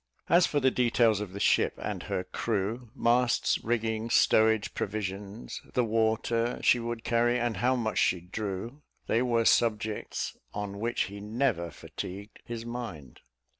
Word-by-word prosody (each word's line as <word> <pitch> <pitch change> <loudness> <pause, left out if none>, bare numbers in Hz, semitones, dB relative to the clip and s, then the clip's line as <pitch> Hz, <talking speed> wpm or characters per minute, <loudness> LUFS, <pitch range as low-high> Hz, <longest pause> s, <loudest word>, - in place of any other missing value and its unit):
As 175 +1 +6
for 145 - +1
the 130 -1 +3
details 120 -4 +3
of 105 -3 -5
the 100 - -7
ship - - +3
and - - -4
her 90 - -1
crew, 110 +4 -2
masts, 120 -1 +2
rigging, 115 -1 -1
stowage, 110 -2 +4
provisions, 100 +1 -4
the 125 - +3
water 115 +1 +1
she 125 - +5
would 115 -1 -4
carry, 120 +1 +2
and 120 -4 -1
how 125 +5 +2
much 110 -3 -1
she 90 - +3
drew, 100 - -5 0.2
they 115 - +2
were 120 -2 +2
subjects 110 -2 +1 0.2
on 100 -1 -4
which 120 +2 -1
he 100 +1 -3
never 105 -4 -1
fatigued 100 +6 -8
his 115 -1 -6
mind. 115 - -7
115 Hz, 150 wpm, -29 LUFS, 105-120 Hz, 0.2 s, As